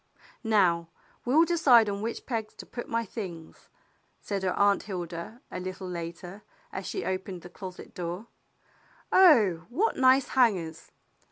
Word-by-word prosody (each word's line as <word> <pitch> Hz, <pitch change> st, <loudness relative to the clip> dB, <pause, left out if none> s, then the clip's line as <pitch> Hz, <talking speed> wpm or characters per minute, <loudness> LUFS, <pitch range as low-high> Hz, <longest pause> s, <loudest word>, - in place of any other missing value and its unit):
"Now 180 Hz, -7 st, +3 dB, 0.4 s
we'll 300 Hz, +7 st, +5 dB
decide 275 Hz, -10 st, +5 dB
on 200 Hz, 0 st, -3 dB
which 230 Hz, +2 st, -4 dB
pegs 225 Hz, -4 st, -4 dB
to -, -, -10 dB
put 240 Hz, -, -7 dB
my 230 Hz, 0 st, 0 dB
things," 180 Hz, -7 st, -8 dB, 0.5 s
said 200 Hz, -2 st, -3 dB
her 185 Hz, -1 st, 0 dB
Aunt 200 Hz, 0 st, +4 dB
Hilda, 180 Hz, +3 st, -6 dB
a -, -, -4 dB
little 185 Hz, +1 st, -6 dB
later, 175 Hz, +2 st, -7 dB, 0.3 s
as 190 Hz, -, -5 dB
she -, -, -3 dB
opened 185 Hz, -1 st, -4 dB
the 175 Hz, -, -10 dB
closet 185 Hz, -2 st, -9 dB
door. 175 Hz, +4 st, -5 dB, 0.9 s
"Oh, 220 Hz, -, +5 dB
what 390 Hz, -, 0 dB
nice 260 Hz, +1 st, +4 dB
hangers! 185 Hz, -11 st, +1 dB
200 Hz, 145 wpm, -28 LUFS, 180-235 Hz, 0.9 s, we'll